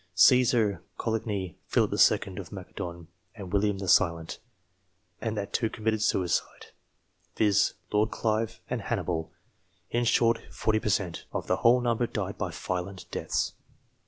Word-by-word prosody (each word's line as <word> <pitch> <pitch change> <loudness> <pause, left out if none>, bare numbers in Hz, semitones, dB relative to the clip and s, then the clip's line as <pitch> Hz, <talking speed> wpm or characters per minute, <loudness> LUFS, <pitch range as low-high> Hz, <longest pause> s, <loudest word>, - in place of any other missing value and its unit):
Caesar, 115 -1 +5 0.2
Coligny, 105 -6 -2
Philip - - +2
II. 95 - +3
of 95 -4 -7
Macedon, 90 -3 -7 0.3
and 100 -4 -8
William 100 0 +2
the 95 -1 -5
Silent; 85 -4 +2 0.8
and 110 -2 -2
that 100 -1 -4
two 115 - +1
committed 110 -1 -1
suicide, 90 -4 0 0.6
viz. 105 -3 +3 0.2
Lord 105 +1 +2
Clive 110 0 -1
and 125 - -2
Hannibal. 90 -6 -2 0.6
In 120 +1 +1
short, 115 0 +3
40 110 -1 +1
per 105 - -2
cent, 90 -4 -1
of - - -3
the - - +1
whole 125 +2 +5
number 120 0 +1
died - - -4
by - - -1
violent 90 +1 -4
deaths.) - - -1
105 Hz, 140 wpm, -28 LUFS, 95-115 Hz, 0.8 s, Caesar